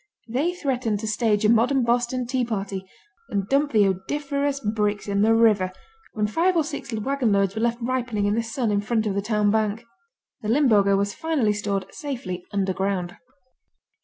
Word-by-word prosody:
They 285 +10 -1
threatened 250 - -1
to 220 - -4
stage 215 -1 +1
a - - +5
modern 245 +4 +3
Boston 245 +1 0
Tea 255 +1 0
Party 195 -4 -4 0.4
and 200 -1 -2
dump 285 +3 +2
the 210 -3 +4
odoriferous 280 +8 -1
bricks 210 -2 -1
in 200 0 +1
the 225 +2 +4
river, 210 -5 +3 0.4
when 210 -1 0
five 335 - +1
or 320 - +3
six 285 -3 -6
wagonloads 215 -4 +1
were 220 - -3
left 235 0 +1
ripening 240 -4 -1
in 205 - +2
the 230 - +1
sun 230 0 -2
in 205 0 +1
front 220 +1 0
of 205 - 0
the 200 - -1
town 210 -1 +1
bank. 220 +1 0 0.6
The 215 - -4
Limburger 215 -7 +4
was 200 0 -1
finally 305 -10 0
stored 200 -2 -2
safely 235 - -5
underground. 190 -2 -1
220 Hz, 175 wpm, -24 LUFS, 205-255 Hz, 0.6 s, a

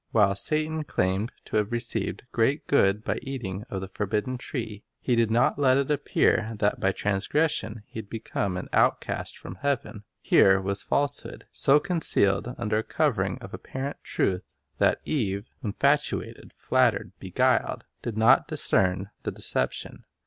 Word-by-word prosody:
While 105 -3 +4
Satan 155 +8 -1
claimed 95 -3 -1
to - - -1
have 105 0 0
received 120 -1 -1
great 135 +6 +1
good 105 -6 +3
by - - -1
eating 110 -7 -5
of 95 - -4
the 95 - -5
forbidden 105 +6 -2
tree, 110 -6 -5 0.2
he 125 - +1
did 115 -2 +2
not 120 +5 +2
let 130 -2 +4
it 140 +1 0
appear 115 -5 +1
that 105 0 +1
by 95 - +2
transgression 110 - -1
he - - -8
had 105 - -9
become 100 -4 -3
an 90 - -5
outcast - - +1
from 90 - -9
heaven. 135 -7 -2 0.2
Here 95 0 +5
was 100 +1 -1
falsehood, 145 0 -1
so 140 +2 +4
concealed 125 - +2
under 110 -2 0
a - - -2
covering - - 0
of - - -10
apparent 135 +2 -5
truth 90 -2 -2 0.2
that - - +3
Eve, 100 -8 -1 0.2
infatuated, 140 +7 0
flattered, - - +1
beguiled, - - +1 0.2
did 115 -2 -4
not 115 +4 +5
discern 95 +1 +1
the - - -3
deception. - - -1
110 Hz, 150 wpm, -26 LUFS, 100-135 Hz, 0.2 s, Here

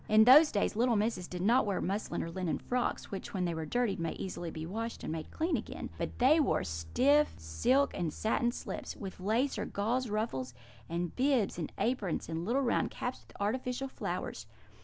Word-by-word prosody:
"In 215 +1 +7
those 290 +6 +8
days 205 - 0
little 240 +1 +3
misses 210 -4 0
did 180 0 -5
not 240 +6 +5
wear 200 -3 -1
muslin 200 +4 -2
or 165 - -5
linen 180 -1 -1
frocks, 250 0 -2
which, 195 +1 -6
when 180 -1 0
they 170 - -1
are 160 -1 -4
dirtied, 240 -1 0
may 165 -1 -1
easily 175 -2 -5
be 160 0 -6
washed 225 +6 -4
and - - -3
made 160 -1 -4
clean 330 +3 0
again; - - -5
but - - -3
they 275 +6 +5
wore 300 - +2
stuff, 255 - +2
silk, 245 - +2
and 170 -4 -1
satin 230 +7 +1
slips, - - -6
with 190 -2 -7
lace 225 +9 +1
or - - -1
gauze 235 +5 -1
ruffles, 135 - -2 0.3
and 170 0 -2
bibs, 255 -9 +2
and 160 - -3
aprons, 220 -8 -1
and 165 +1 -3
little 255 +6 +1
round 240 - +1
caps 250 - -4
with - - -16
artificial 250 +5 -1
flowers. 265 - -4
215 Hz, 200 wpm, -32 LUFS, 175-250 Hz, 0.3 s, those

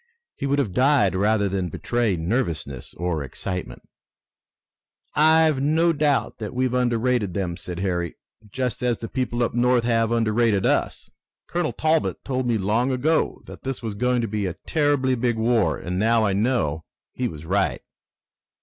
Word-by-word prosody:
He 140 - -3
would 140 +1 +1
have 115 -10 0
died 130 -4 +3
rather 100 +1 +2
than 95 -2 -2
betray 120 +4 0
nervousness 80 - -3
or 85 -3 -2
excitement. 90 +6 -6 1.3
"I've 155 -1 +4
no 160 +4 +3
doubt 150 -2 0
that 110 +1 -6
we've 130 0 0
underrated 120 -5 +1
them," 90 -3 -2
said 90 +1 -6
Harry. 85 -3 -2 0.3
"Just 125 +3 -3
as 120 -2 +1
the 115 - -6
people 120 -1 -1
up - - -1
North 120 0 +3
have 115 -1 +1
underrated 115 -3 +2
us. - - 0 0.4
Colonel 175 -2 -1
Talbot 160 0 0
told 130 -2 -1
me 115 -2 +2
long 110 +6 +1
ago 150 +6 0
that - - -11
this 135 -2 -5
was 110 -2 -3
going 125 +3 +1
to 115 - -1
be 105 -1 -2
a 90 - -4
terribly 145 -4 +2
big 120 -2 0
war, 115 -1 +2
and 90 +1 -4
now 110 +1 +3
I 100 - +1
know 95 - 0 0.3
he 125 - -1
was 80 -4 -8
right." 95 +3 0
115 Hz, 165 wpm, -23 LUFS, 100-130 Hz, 1.3 s, I've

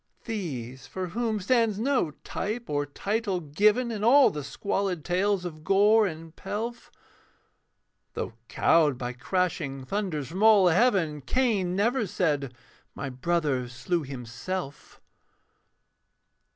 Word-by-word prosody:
These, 135 - -5
for 185 +6 -5
whom 225 +2 -1
stands 225 0 +2
no 255 - +1
type 220 +2 -4
or 145 0 0
title 200 - -2
given 210 - +2
In 210 -2 -4
all 270 +4 +6
the 150 -1 -5
squalid 185 +4 -2
tales 185 +1 +1
of 155 -3 -7
gore 210 +3 +4
and 165 -1 -8
pelf; 235 +3 -5 1.3
Though - - -4
cowed 150 -6 +3
by 125 0 -4
crashing 155 -2 -2
thunders 180 -6 -3
from 185 +5 -5
all 210 -4 +7
heaven. 175 - +2
Cain 200 - +1
never 225 +3 +1
said, 145 -8 -1 0.4
'My 140 -1 -5
brother 135 -2 -1
slew 165 +8 -2
himself.' 135 +5 -6
180 Hz, 120 wpm, -27 LUFS, 145-210 Hz, 1.3 s, all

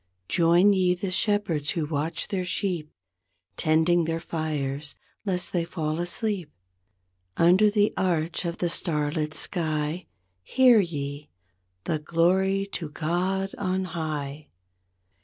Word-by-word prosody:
Join 175 +4 +5
ye 180 -2 +2
the 185 +1 -4
shepherds 190 -7 +1
who 165 -3 0
watch 150 +2 -2
their 190 -2 -1
sheep 180 -4 -2 0.6
Tending 160 +2 +3
their 165 0 -1
fires 150 -3 -3 0.3
lest 180 -2 -2
they 175 -2 +1
fall 160 -2 -3
asleep; 175 0 -2 0.9
Under 185 +5 +5
the 205 0 +2
arch 170 -3 0
of 170 -1 -3
the 175 - 0
star 150 -4 0
lit 155 -1 -2
sky. 155 0 -2 0.3
Hear 245 - +5
ye, 145 -5 -3 0.5
the 155 - -1
''Glory 185 +5 +2
to 160 -4 -4
God 185 +5 -1
on 190 -1 0
High". 150 -3 -4
170 Hz, 120 wpm, -26 LUFS, 155-185 Hz, 0.9 s, Join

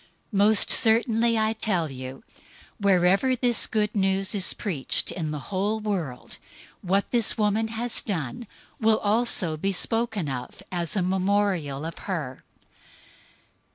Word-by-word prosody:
026:013 - - -1
Most 210 +1 +5
certainly 230 0 +4
I 220 0 +1
tell 185 -9 -1
you, 130 +5 -9 0.6
wherever 195 +5 +2
this 245 -1 +3
Good 210 -1 -1
News 195 0 0
is 195 -3 +4
preached 170 - -1
in 160 -4 -4
the 150 - -4 0.2
whole 205 +4 -1
world, 180 -12 -5 0.4
what 195 +2 -1
this 235 -4 +2
woman 215 +1 0
has 230 +2 -3
done 185 - -5 0.3
will 220 -1 +3
also 205 -7 +1
be 195 +5 -2
spoken 220 -2 0
of 125 -2 -7
as 175 -1 -2
a 190 - 0
memorial 185 -6 -1
of 165 - -7
her." 150 -9 -5
200 Hz, 135 wpm, -24 LUFS, 170-220 Hz, 0.6 s, Most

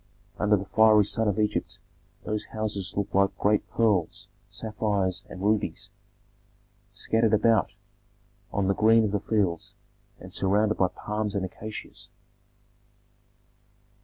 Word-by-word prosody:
Under 105 0 +3
the 100 - -5
fiery 110 +1 +5
sun 110 +2 0
of 100 0 0
Egypt 105 -1 -1 0.5
those 105 0 -3
houses 100 -4 -4
looked 100 - -2
like 100 0 +2
great 105 +1 +1
pearls, 105 -7 0 0.2
sapphires, 100 -4 -2
and 95 - -8
rubies, 105 -5 -1 1.0
scattered 110 -1 +1
about 110 -2 +2 0.8
on 100 -2 0
the 100 - +3
green 110 +2 +4
of 105 - 0
the 105 - 0
fields, 100 -5 -1 0.4
and - - -12
surrounded 105 +2 +2
by 95 - +4
palms 105 +2 -4
and 95 -2 0
acacias. 110 +3 -9
105 Hz, 125 wpm, -26 LUFS, 100-110 Hz, 1.0 s, fiery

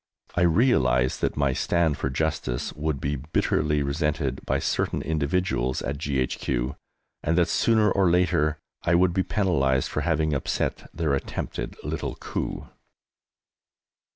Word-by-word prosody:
I 90 - 0
realized 80 - +3
that - - 0
my 70 -2 +2
stand 85 +1 +1
for 65 - -2
justice 65 -3 -2
would 75 -2 -2
be 70 +2 -1
bitterly 75 +1 0
resented 70 -1 -1
by - - +2
certain - - -1
individuals 75 -4 0
at 70 +1 -3
G.H.Q., 65 -2 -1 0.5
and 80 +2 0
that, 85 - +4
sooner 110 -3 +3
or 95 -2 +3
later, 80 -3 +2 0.2
I 85 - +2
would 90 0 +4
be 95 - +2
penalised 70 -11 +1
for - - -2
having 80 -2 +1
upset 70 - -2
their 80 -3 -1
attempted 70 - -3
little - - -3
coup. - - -4
75 Hz, 135 wpm, -25 LUFS, 70-85 Hz, 0.5 s, that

